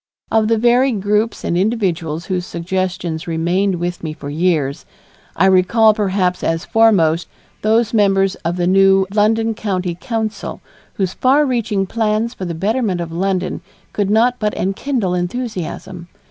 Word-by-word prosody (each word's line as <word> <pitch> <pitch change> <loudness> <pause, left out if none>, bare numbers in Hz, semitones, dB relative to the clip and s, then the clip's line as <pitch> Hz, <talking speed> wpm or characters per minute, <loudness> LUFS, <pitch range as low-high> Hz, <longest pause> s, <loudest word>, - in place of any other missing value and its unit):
Of 220 -1 +3
the 225 0 +2
varied 240 0 +3
groups 210 +2 0
and - - -1
individuals 175 -5 -1
whose 180 -2 -2
suggestions 175 -1 -3
remained 175 +4 0
with 175 +1 -4
me 155 -2 -4
for 145 -2 -8
years, 155 -4 0 0.5
I 185 - +3
recall 190 +4 +4
perhaps 190 -3 0
as 165 +2 -1
foremost 175 -8 +3 0.3
those 225 +2 +2
members 195 -3 +3
of 170 +2 -2
the 175 - 0
new 195 +1 +4
London 225 +2 +2
County 190 -5 -2
Council 220 +2 -4 0.4
whose 190 -2 -1
far 275 +4 +3
reaching 225 -6 0
plans 220 +2 -1
for 190 - -6
the 170 -2 -4
betterment 205 +1 0
of 170 -1 -5
London 185 +1 -2 0.3
could 205 -2 -1
not 240 +4 +2
but 210 -1 -1
enkindle 195 0 -1
enthusiasm. 180 -2 -4
195 Hz, 145 wpm, -18 LUFS, 175-220 Hz, 0.5 s, recall